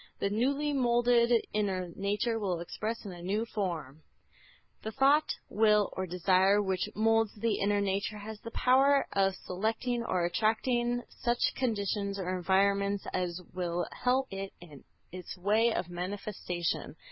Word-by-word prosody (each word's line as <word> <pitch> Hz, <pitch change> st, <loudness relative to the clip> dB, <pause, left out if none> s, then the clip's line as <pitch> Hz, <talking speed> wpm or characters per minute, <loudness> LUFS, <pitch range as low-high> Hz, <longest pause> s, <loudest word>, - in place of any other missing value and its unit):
The 200 Hz, -, -1 dB
newly 280 Hz, +7 st, +1 dB
moulded 240 Hz, -2 st, +3 dB
inner 190 Hz, -4 st, -1 dB
nature 210 Hz, +4 st, -1 dB
will 185 Hz, -5 st, -1 dB
express 215 Hz, +7 st, -4 dB
in 200 Hz, -, -6 dB
a 175 Hz, -1 st, -10 dB
new 205 Hz, +6 st, -1 dB
form." 165 Hz, -, -4 dB
(Bhagavad -, -, -41 dB
Gîtâ.) -, -, -30 dB
The 220 Hz, -, -2 dB
thought, 285 Hz, +6 st, +3 dB
will 210 Hz, -1 st, +3 dB
or 185 Hz, 0 st, -3 dB
desire 185 Hz, +3 st, +3 dB
which 190 Hz, 0 st, -1 dB
moulds 225 Hz, 0 st, +2 dB
the 220 Hz, 0 st, -1 dB
inner 205 Hz, +1 st, +2 dB
nature 200 Hz, +2 st, -1 dB
has 210 Hz, +1 st, -8 dB
the 230 Hz, -, -7 dB
power 270 Hz, +4 st, +4 dB
of 195 Hz, -1 st, +2 dB
selecting 225 Hz, +7 st, -2 dB
or 180 Hz, -6 st, 0 dB
attracting 240 Hz, +5 st, +1 dB
such 240 Hz, 0 st, 0 dB
conditions 200 Hz, -4 st, -1 dB
or 185 Hz, -1 st, -2 dB
environments 200 Hz, +2 st, +1 dB
as 180 Hz, -1 st, -2 dB
will 175 Hz, -1 st, -2 dB
help 255 Hz, -2 st, 0 dB
it 195 Hz, 0 st, -5 dB
in 150 Hz, -6 st, -13 dB, 0.3 s
its 180 Hz, +1 st, -8 dB
way 215 Hz, +5 st, +3 dB
of 185 Hz, -, -2 dB
manifestation. 180 Hz, -1 st, -4 dB
205 Hz, 150 wpm, -30 LUFS, 185-230 Hz, 0.3 s, power